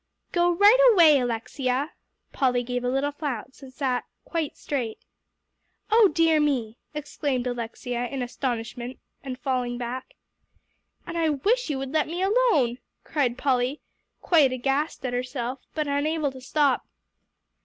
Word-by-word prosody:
"Go 350 Hz, 0 st, +3 dB
right 410 Hz, +7 st, +6 dB
away, 325 Hz, -8 st, +7 dB
Alexia." 255 Hz, +4 st, -1 dB, 0.4 s
Polly 250 Hz, -2 st, +1 dB
gave 245 Hz, 0 st, -3 dB
a 245 Hz, -, 0 dB
little 270 Hz, +3 st, 0 dB
flounce, 275 Hz, -4 st, -5 dB
and 265 Hz, -1 st, -11 dB
sat 255 Hz, -1 st, -1 dB, 0.2 s
quite 325 Hz, -4 st, -3 dB
straight. 245 Hz, -6 st, -3 dB, 0.9 s
"Oh 445 Hz, -1 st, +7 dB
dear 325 Hz, -2 st, +3 dB
me!" 250 Hz, -7 st, 0 dB, 0.2 s
exclaimed 285 Hz, -4 st, -2 dB
Alexia 245 Hz, 0 st, -3 dB
in 265 Hz, 0 st, -3 dB
astonishment, 245 Hz, 0 st, -4 dB, 0.2 s
and 260 Hz, -2 st, -6 dB
falling 250 Hz, -2 st, -1 dB
back. 250 Hz, +2 st, -5 dB, 0.9 s
"And 340 Hz, -, -4 dB
I 325 Hz, -1 st, +2 dB
wish 400 Hz, -, +1 dB
you 290 Hz, -, -1 dB
would 265 Hz, 0 st, -4 dB
let 310 Hz, 0 st, +1 dB
me 345 Hz, +4 st, -2 dB
alone," 385 Hz, -, +3 dB, 0.2 s
cried 255 Hz, -5 st, 0 dB
Polly, 260 Hz, +1 st, +1 dB, 0.4 s
quite 305 Hz, -7 st, +5 dB
aghast 270 Hz, +4 st, -1 dB
at 250 Hz, -, -2 dB
herself, 250 Hz, 0 st, -3 dB, 0.2 s
but 305 Hz, -2 st, -1 dB
unable 290 Hz, +1 st, 0 dB
to 260 Hz, 0 st, -11 dB
stop. 280 Hz, 0 st, +1 dB
270 Hz, 140 wpm, -26 LUFS, 245-305 Hz, 0.9 s, away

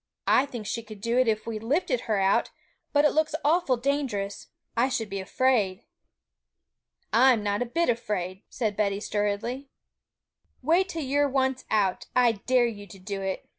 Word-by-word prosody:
'I 270 Hz, -, +4 dB
think 240 Hz, -5 st, -7 dB
she 230 Hz, +3 st, -3 dB
could 215 Hz, -2 st, -11 dB
do 230 Hz, +4 st, +1 dB
it 255 Hz, -, +3 dB
if 215 Hz, -1 st, 0 dB
we 225 Hz, -2 st, -4 dB
lifted 300 Hz, -, 0 dB
her 215 Hz, -3 st, -1 dB
out; 195 Hz, 0 st, +2 dB, 0.4 s
but 290 Hz, 0 st, +4 dB
it 300 Hz, -, +5 dB
looks 310 Hz, 0 st, +1 dB
awful 300 Hz, -4 st, +3 dB
dangerous; 240 Hz, -7 st, -2 dB, 0.3 s
I 245 Hz, +3 st, +2 dB
should 225 Hz, -5 st, -2 dB
be 195 Hz, -, -3 dB
afraid.' 205 Hz, -1 st, +1 dB, 1.3 s
'I'm 240 Hz, -2 st, +5 dB
not 205 Hz, +1 st, 0 dB
a 245 Hz, -, -1 dB
bit 335 Hz, +8 st, 0 dB
afraid,' 195 Hz, -5 st, -2 dB
said 215 Hz, -4 st, -2 dB
Betty 200 Hz, -1 st, 0 dB
sturdily. 210 Hz, +4 st, -1 dB
'You 275 Hz, -, -14 dB, 1.0 s
wait 370 Hz, +3 st, +4 dB
till 325 Hz, -3 st, -4 dB
you're 285 Hz, +2 st, +1 dB
once 265 Hz, -1 st, 0 dB
out. 200 Hz, -4 st, +1 dB
I 250 Hz, -2 st, +5 dB
dare 245 Hz, +3 st, +2 dB
you 205 Hz, -3 st, -5 dB
to 200 Hz, -, -12 dB
do 195 Hz, +1 st, -5 dB
it!' 190 Hz, -1 st, -4 dB
230 Hz, 175 wpm, -27 LUFS, 205-265 Hz, 1.3 s, it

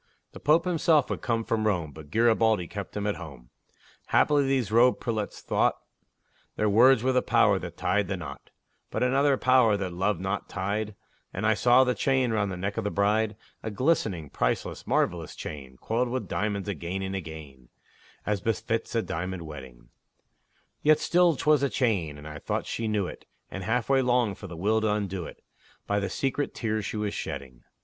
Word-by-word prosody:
The -, -, -11 dB
Pope 155 Hz, +4 st, +3 dB
himself 160 Hz, -5 st, +2 dB
would -, -, -1 dB
have -, -, -18 dB
come 115 Hz, -1 st, 0 dB
from 110 Hz, -1 st, 0 dB
Rome, 85 Hz, -7 st, 0 dB
But 75 Hz, 0 st, -12 dB
Garibaldi 110 Hz, -1 st, +3 dB
kept 100 Hz, +2 st, -6 dB
him 100 Hz, -, -2 dB
at 105 Hz, -, -1 dB
home. 70 Hz, -7 st, -11 dB, 0.6 s
Haply 145 Hz, -2 st, +3 dB
these 130 Hz, -6 st, 0 dB
robed 120 Hz, +3 st, +5 dB
prelates 110 Hz, -4 st, -3 dB
thought -, -, +1 dB, 0.8 s
Their 105 Hz, -, +1 dB
words 120 Hz, +3 st, +6 dB
were 130 Hz, -, +3 dB
the 125 Hz, 0 st, +3 dB
power -, -, +3 dB
that -, -, -8 dB
tied 100 Hz, +1 st, +1 dB
the 95 Hz, 0 st, -2 dB
knot; 70 Hz, -5 st, -9 dB, 0.4 s
But -, -, -1 dB
another 135 Hz, +2 st, +3 dB
power 125 Hz, -5 st, +4 dB
that 95 Hz, -3 st, -4 dB
love 95 Hz, +4 st, 0 dB
knot 95 Hz, +2 st, -3 dB
tied, 100 Hz, +2 st, -2 dB, 0.4 s
And -, -, -3 dB
I 110 Hz, -, +4 dB
saw 120 Hz, +5 st, +5 dB
the 125 Hz, -1 st, +1 dB
chain 130 Hz, -2 st, +1 dB
round 105 Hz, -3 st, 0 dB
the 90 Hz, -, -5 dB
neck 100 Hz, +3 st, -3 dB
of 115 Hz, -, -1 dB
the 105 Hz, -, 0 dB
bride 105 Hz, +2 st, +1 dB, 0.3 s
A 110 Hz, -, -4 dB
glistening, 105 Hz, -, 0 dB
priceless, -, -, -2 dB
marvelous 85 Hz, -3 st, 0 dB
chain, 65 Hz, -4 st, -8 dB
Coiled 120 Hz, +2 st, -1 dB
with 130 Hz, +1 st, -3 dB
diamonds 105 Hz, -1 st, -2 dB
again 95 Hz, +1 st, -3 dB
and 95 Hz, 0 st, -3 dB
again, 75 Hz, -8 st, -8 dB, 0.6 s
As 105 Hz, -3 st, -1 dB
befits 115 Hz, +2 st, -2 dB
a 115 Hz, -, +2 dB
diamond 90 Hz, +1 st, -4 dB
wedding; 65 Hz, -6 st, -11 dB, 0.9 s
Yet 155 Hz, 0 st, +5 dB
still 175 Hz, 0 st, +3 dB
'twas 150 Hz, +1 st, +3 dB
a 140 Hz, -, +2 dB
chain, 95 Hz, -, 0 dB
and 75 Hz, +1 st, -10 dB
I 75 Hz, -1 st, -7 dB
thought -, -, -2 dB
she 115 Hz, -, -3 dB
knew 105 Hz, -3 st, 0 dB
it, -, -, -9 dB, 0.2 s
And 95 Hz, -, -5 dB
halfway 125 Hz, +5 st, +2 dB
longed 120 Hz, -5 st, +1 dB
for 100 Hz, -, -8 dB
the 85 Hz, -2 st, -9 dB
will 110 Hz, +5 st, +1 dB
to 110 Hz, -1 st, +1 dB
undo 100 Hz, -4 st, -2 dB
it, -, -, -13 dB, 0.4 s
By 100 Hz, 0 st, 0 dB
the 100 Hz, -1 st, -2 dB
secret 135 Hz, +7 st, -2 dB
tears 110 Hz, -3 st, -2 dB
she -, -, -4 dB
was 105 Hz, -1 st, -2 dB
shedding. 65 Hz, -3 st, -6 dB
105 Hz, 190 wpm, -27 LUFS, 90-120 Hz, 0.9 s, words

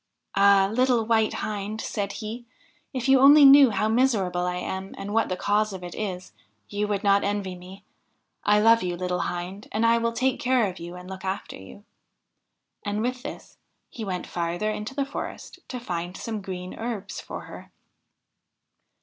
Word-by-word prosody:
'Ah! 200 Hz, -1 st, +5 dB
little 250 Hz, -2 st, +2 dB
White 220 Hz, -1 st, +2 dB
Hind,' 210 Hz, 0 st, -4 dB
said 205 Hz, -3 st, -3 dB
he, 230 Hz, +2 st, -7 dB, 0.4 s
'if 255 Hz, -3 st, -3 dB
you 270 Hz, 0 st, +6 dB
only 285 Hz, +2 st, +8 dB
knew 275 Hz, -1 st, +9 dB
how 215 Hz, 0 st, 0 dB
miser 230 Hz, -3 st, +2 dB
able 180 Hz, 0 st, -2 dB
I 180 Hz, -, -1 dB
am, 190 Hz, +2 st, -5 dB
and 200 Hz, +1 st, -5 dB
what 225 Hz, 0 st, +2 dB
the 185 Hz, -, -2 dB
cause 210 Hz, +1 st, +1 dB
of 185 Hz, -1 st, -7 dB
it 175 Hz, -1 st, -7 dB
is, 185 Hz, -4 st, -5 dB, 0.4 s
you 205 Hz, 0 st, -1 dB
would 205 Hz, -1 st, -2 dB
not 200 Hz, 0 st, +4 dB
envy 200 Hz, -2 st, -2 dB
me! 185 Hz, +3 st, -13 dB, 0.6 s
I 210 Hz, 0 st, +4 dB
love 230 Hz, +1 st, +6 dB
you, 175 Hz, -1 st, -2 dB
little 180 Hz, 0 st, -2 dB
Hind, 180 Hz, +4 st, -4 dB
and 220 Hz, +2 st, +1 dB
I 230 Hz, 0 st, +4 dB
will 230 Hz, 0 st, 0 dB
take 260 Hz, +2 st, 0 dB
care 250 Hz, -4 st, +2 dB
of 185 Hz, -1 st, -7 dB
you 170 Hz, +1 st, -8 dB
and 180 Hz, 0 st, -10 dB
look 190 Hz, 0 st, -8 dB
after 190 Hz, +1 st, -4 dB
you.' 95 Hz, -, -13 dB, 1.0 s
And 210 Hz, +1 st, -2 dB
with 250 Hz, +1 st, -2 dB
this -, -, -9 dB, 0.3 s
he 230 Hz, -, -7 dB
went 185 Hz, -3 st, -3 dB
farther 175 Hz, +5 st, -2 dB
into 215 Hz, +5 st, -5 dB
the 280 Hz, -1 st, 0 dB
forest 280 Hz, -, -7 dB
to 250 Hz, -, -5 dB
find 175 Hz, -4 st, -4 dB
some 220 Hz, -2 st, -4 dB
green 185 Hz, -1 st, -6 dB
herbs 220 Hz, -4 st, -5 dB
for -, -, -7 dB
her. -, -, -11 dB
205 Hz, 185 wpm, -25 LUFS, 185-230 Hz, 1.0 s, knew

